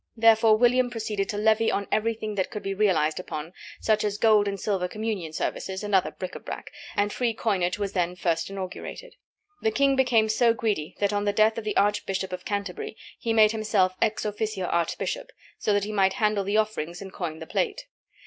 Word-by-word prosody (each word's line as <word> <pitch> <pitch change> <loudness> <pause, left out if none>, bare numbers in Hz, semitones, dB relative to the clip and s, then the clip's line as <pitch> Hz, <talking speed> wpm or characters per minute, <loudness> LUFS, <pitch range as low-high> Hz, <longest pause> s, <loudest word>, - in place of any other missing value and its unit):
Therefore 225 -1 +6
William 245 +2 +4
proceeded 215 -4 -3
to 205 - -2
levy 220 +1 +3
on 200 - -1
everything 215 -1 0
that 190 -2 -1
could 210 - -6
be 195 - -2
realized 175 -7 +2
upon, 160 -1 -6 0.3
such 215 -1 +2
as 205 -1 -1
gold 210 -1 +4
and 200 0 -3
silver 190 -3 0
communion 210 -5 -3
services 190 +4 -3
and 205 -1 -4
other 190 -1 +4
bric 185 - -6
à - - -9
brac, - - -7 0.2
and 205 0 +1
free 235 -3 0
coinage 190 -6 0
was 200 -1 -3
then 180 -1 0
first 165 -2 -1
inaugurated. 195 - -7 0.5
The 220 - +2
king 275 +5 +3
became 245 -4 +3
so 230 +1 +3
greedy 210 -11 -2
that 205 0 +1
on 205 0 0
the 205 - +1
death 220 +2 +3
of 220 - -9
the 210 - -1
Archbishop 195 -2 0
of 180 - -6
Canterbury 200 +1 -4 0.2
he 230 - -1
made 215 -1 +6
himself 215 -4 +1
ex 215 0 +1
officio 210 -2 -2
archbishop, 330 - -1 0.3
so - - 0
that 205 -1 +2
he 210 - -3
might 195 -2 +3
handle 215 -4 +1
the 200 +2 0
offerings 175 -6 -1
and 195 -1 -9
coin 165 -4 -4
the - - -8
plate. 435 -1 -2
210 Hz, 205 wpm, -26 LUFS, 190-220 Hz, 0.5 s, Therefore